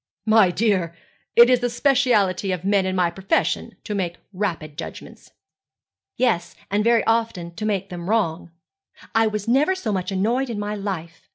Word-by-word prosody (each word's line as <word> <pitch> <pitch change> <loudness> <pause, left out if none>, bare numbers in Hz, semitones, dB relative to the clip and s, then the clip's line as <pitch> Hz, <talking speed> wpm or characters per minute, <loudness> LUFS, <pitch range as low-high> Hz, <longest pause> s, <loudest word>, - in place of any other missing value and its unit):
'My 215 -4 +5
dear, 185 -4 0 0.4
it 235 0 +9
is 250 -1 +4
the 245 0 -1
speciality 235 -8 +2
of 185 -1 -4
men 200 -1 +2
in 185 - -1
my 180 -2 +2
profession 190 +3 -1
to 210 - -4
make 180 -4 -2 0.2
rapid 170 -6 -3
judgments.' - - -9 0.9
'Yes, 220 -9 0 0.2
and 205 +1 +2
very 230 0 +3
often 225 -7 -1
to 215 +5 -4
make 195 -2 -1
them 175 0 -6
wrong. 180 -7 0 0.6
I 225 0 +3
was 210 -1 -3
never 285 +10 +3
so 235 -13 -3
much 190 -1 -2
annoyed 235 +8 0
in 230 - -4
my 205 0 -3
life. 190 -5 -6
205 Hz, 170 wpm, -22 LUFS, 180-230 Hz, 0.9 s, it